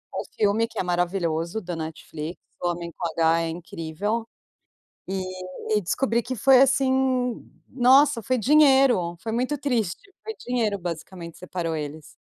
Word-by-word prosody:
um - - -2
filme 215 +2 +2
que 225 -1 -7
é - - +1
maravilhoso 175 +1 -1
da 175 -3 -5
Netflix, 160 0 -6 0.2
O 175 - +1
Homem 170 0 -4
com 175 - -1
H, 165 +1 +4
é 165 - -2
incrível. 175 +6 -4 0.8
E 190 0 -2 0.4
e 210 -1 +2
descobri 235 +5 0
que 255 +2 -5
foi 260 +3 +6
assim, 260 -2 +2 0.2
nossa, 265 0 +4
foi 255 +4 0
dinheiro, 265 - +4
foi 225 +1 -5
muito 255 +5 -1
triste, 260 - -2
foi 440 -1 -6
dinheiro 230 -5 0
basicamente 170 -1 -7
separou 175 -3 -3
eles. 150 0 -7
205 Hz, 145 wpm, -25 LUFS, 170-255 Hz, 0.8 s, foi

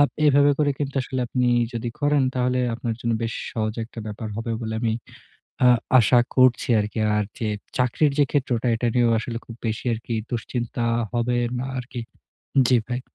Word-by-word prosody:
আব 145 - +6 0.2
এভাবে 145 0 +5
করে 145 -1 +3
কিন্তু 140 -1 -3
আসলে 130 0 -3
আপনি 125 0 +1 0.3
যদি 115 +1 -3
করেন 145 -1 +3
তাহলে 125 0 +1
আপনার 115 -1 -3
জন্য 115 -1 0
বেশ 115 - -2 0.2
সহজ 110 -1 -2
একটা 115 - -12
ব্যাপার 110 +1 -5
হবে 115 +1 -3
বলে 110 -1 -3
আমি 110 -1 +1 0.7
আ - - +8 0.3
আশা 120 +2 +5 0.2
করছি 130 -1 +4
আরকি। 105 +1 -3 0.2
আর 105 - +2 0.2
যে 110 - -1 0.3
চাকরির 130 +4 +2
যে - - +7
ক্ষেত্রটা 125 -4 0
এটা 120 +1 -1
নিয়েও 120 -1 +4
আসলে 115 -1 -4
খুব 115 - -9
বেশি 110 +3 -3
আরকি 115 +1 -5 0.2
দুশ্চিন্তা 120 +1 -3 0.3
হবে 120 +1 0 0.2
না 130 - -3
আরকি 120 -1 -6 0.7
জ্বি 125 -2 +5
ভাই। 125 0 -2
120 Hz, 180 wpm, -24 LUFS, 115-130 Hz, 0.7 s, আ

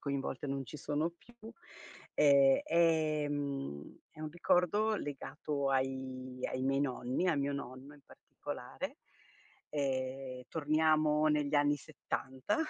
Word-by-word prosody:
coinvolte 140 -1 -3
non 135 0 -2
ci 130 - -8
sono 150 +3 -1
più, 240 - -20 0.8
e, 140 -2 +6
ehm, 145 - +1
è 155 - -14
un 155 -1 -4
ricordo 180 +6 +2
legato 140 -1 -3
ai 130 -1 -2
ai 130 - -2
miei 135 +1 +2
nonni, 130 +5 0
a 165 - +3
mio 140 0 0
nonno 135 +1 -7
in 145 - -18
particolare. - - -7 0.7
Ehm, 130 -2 -2
torniamo 155 0 +3
negli 150 -1 +1
anni 145 0 +4
'70, 130 - -3
145 Hz, 120 wpm, -34 LUFS, 135-155 Hz, 0.8 s, e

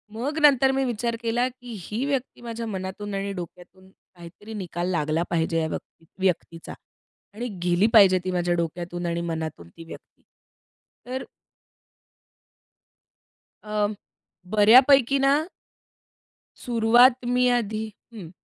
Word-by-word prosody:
मग 280 +7 -3
नंतर 270 -3 +5
मी 270 0 0
विचार 235 -1 -2
केला, 235 +2 0
की 245 -1 -12
ही 220 +8 -4
व्यक्ती 275 -3 -3
माझ्या 230 -1 -6
मनातून 195 0 -5
आणि 195 0 -3
डोक्यातून 180 +1 -11
काहीतरी 190 +3 -14
निकाल 175 -4 -4
लागला 155 -1 0
पाहिजे 165 0 0
या 160 - -1
व्यक्ती 165 - -8 0.2
व्यक्तीचा. 170 -2 -2 0.6
आणि 235 +4 -5 0.2
गेली 175 +4 +3
पाहिजे 195 -4 +7
ती 185 - -2
माझ्या 175 -1 0
डोक्यातून 175 +1 -4
आणि 170 0 -2
मनातून 160 - -5
ती 165 - -13
व्यक्ती. 165 - -13 0.8
तर 255 +1 -5 2.4
अ, 210 -1 0 0.7
बऱ्यापैकी 255 +5 +6
ना 280 +4 +2 1.2
सुरुवात 240 +1 +4 0.2
मी 250 0 +3
आधी 215 -1 -3 0.3
हं. 195 -8 -9
205 Hz, 120 wpm, -24 LUFS, 175-245 Hz, 2.4 s, पाहिजे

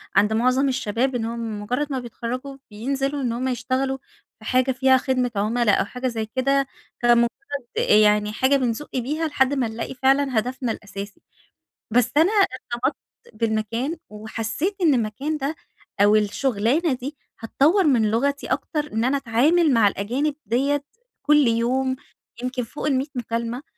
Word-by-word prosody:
عند 205 +2 +4
معظم 255 +4 +2
الشباب 255 0 -1
إنهم 230 -2 -3
مجرّد 250 +8 -1
ما 265 - -1
بيتخرّجوا 250 +3 -6
بينزلوا 270 +6 -2
إن 245 -3 0
هم 250 +2 -2
يشتغلوا 260 +2 -1 0.4
بحاجة 255 +1 +1
فيها 260 +1 +4
خدمة 255 -2 0
عُملا 215 +2 +2
أو - - +2
حاجة 250 +5 -4
زي 225 -3 -2
كده، 270 +4 +1 0.3
كمُجرّد 240 0 +5 0.5
يعني 210 0 +4
حاجة 260 +5 +3
بنزُق 255 +1 -1
بيها 300 +6 -1
لحد 270 -2 +2
ما 265 -4 0
نلاقي 225 +3 -5
فعلًا 270 -1 +2
هدفنا 250 +1 -3
الأساسي. 200 -1 -8 0.7
بس 245 +1 +3
أنا 330 +7 +5
ارتبطت 265 - 0 0.4
بالمكان، 230 +7 -1
وحسيت 225 - -3
إن 315 -5 +5
المكان 255 +7 -1
ده 285 +3 -2 0.5
أو 205 +1 +6
الشغلانة 240 - +1
دي، 275 +4 -6 0.2
هتطوَّر 300 - +3
من 235 -9 +3
لغتي 280 +6 0
أكتر 300 -2 -2
إن 225 - 0
أنا 260 +3 +2
أتعامل 280 +6 +3
مع 225 -4 +5
الأجانب 250 +10 -1
ديَّة 275 +6 +1 0.4
كل 295 -3 +4
يوم، 250 +3 +1 0.5
يمكن 250 0 -2
فوق 295 +6 -5
ال100 270 -1 +1
مكالمة، 235 +1 -3
255 Hz, 145 wpm, -23 LUFS, 225-275 Hz, 0.7 s, أو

